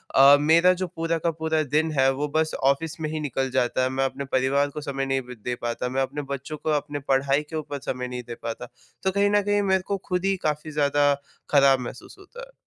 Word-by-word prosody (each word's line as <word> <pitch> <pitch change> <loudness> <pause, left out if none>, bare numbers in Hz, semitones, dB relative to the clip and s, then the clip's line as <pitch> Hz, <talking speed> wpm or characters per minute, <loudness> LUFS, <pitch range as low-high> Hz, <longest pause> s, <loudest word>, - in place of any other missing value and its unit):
अ, 140 +1 +8
मेरा 165 +4 +5
जो 185 0 -3
पूरा 165 -1 -2
का 165 +1 0
पूरा 160 0 -1
दिन 155 +3 0
है 135 0 +5
वो 145 +2 -2
बस 160 0 +1
ऑफिस 150 +4 +1
में 155 - -2
ही 155 - -3
निकल 135 -3 -2
जाता 125 +1 +1
है। 130 - +1
मैं 135 +1 0
अपने 140 +1 -4
परिवार 135 +2 +1
को 150 +1 -7
समय 135 -2 -3
नहीं 135 0 0
ब 125 - -7
दे 125 0 -2
पाता 120 +1 -2
मैं 135 +1 -1
अपने 140 +3 -2
बच्चों 140 +3 -6
को 155 - -4
अपने 145 0 -1
पढ़ाई 135 +1 +2
के 160 - -6
ऊपर 145 -2 -4
समय 125 -1 -3
नहीं 125 0 -6
दे 120 - -6
पाता। 115 +1 -5 0.4
तो 190 - +2
कहीं 200 +1 +2
न 205 0 +3
कहीं 205 0 +1
मेरे 190 -1 +3
को 200 - -1
ख़ुद 180 +1 0
ही 195 0 +2
काफ़ी 155 0 -2
ज़्यादा 145 -1 +3 0.4
ख़राब 140 -2 +5
महसूस 125 - -8
होता 390 +5 -12
है। - - -22
145 Hz, 240 wpm, -25 LUFS, 135-160 Hz, 0.4 s, अ